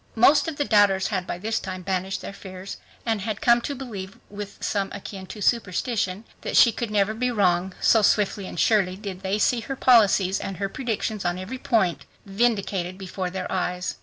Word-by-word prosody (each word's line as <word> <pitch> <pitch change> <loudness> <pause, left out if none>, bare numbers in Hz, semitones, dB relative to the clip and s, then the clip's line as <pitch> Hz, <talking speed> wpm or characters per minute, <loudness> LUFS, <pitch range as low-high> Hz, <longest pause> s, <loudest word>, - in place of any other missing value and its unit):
Most 280 +6 +5
of 325 - -3
the 290 - 0
doubters 205 -4 +4
had 185 -4 -2
by - - -3
this 220 +4 -1
time 185 -1 -6
banished 190 +1 -2
their - - -7
fears 190 0 -8 0.3
and 225 -3 0
had 210 0 -3
come 235 0 +4
to 285 - -4
believe 205 -8 -7
with 205 0 -7
something 200 -1 -2
akin 195 -1 -8
to 210 +1 -7
superstition 210 -2 0 0.2
that - - -1
she 235 - +8
could 235 +1 -4
never 210 0 +1
be 250 +3 -1
wrong, 185 -4 +1
so 225 - +5
swiftly 205 -1 +2
and - - -6
surely, 195 -5 +3
did 195 -3 -7
they 195 +1 -1
see 235 +3 +2
her 270 +4 -5
policies 205 -7 +4
and 195 - -5
her 195 0 -2
predictions 220 -3 -3
on 175 0 -1
every 200 +8 -6
point 215 -10 +1 0.2
vindicated 195 -4 0
before 185 -1 -4
their 185 0 -5
eyes. 180 -1 -2
200 Hz, 195 wpm, -24 LUFS, 190-225 Hz, 0.3 s, she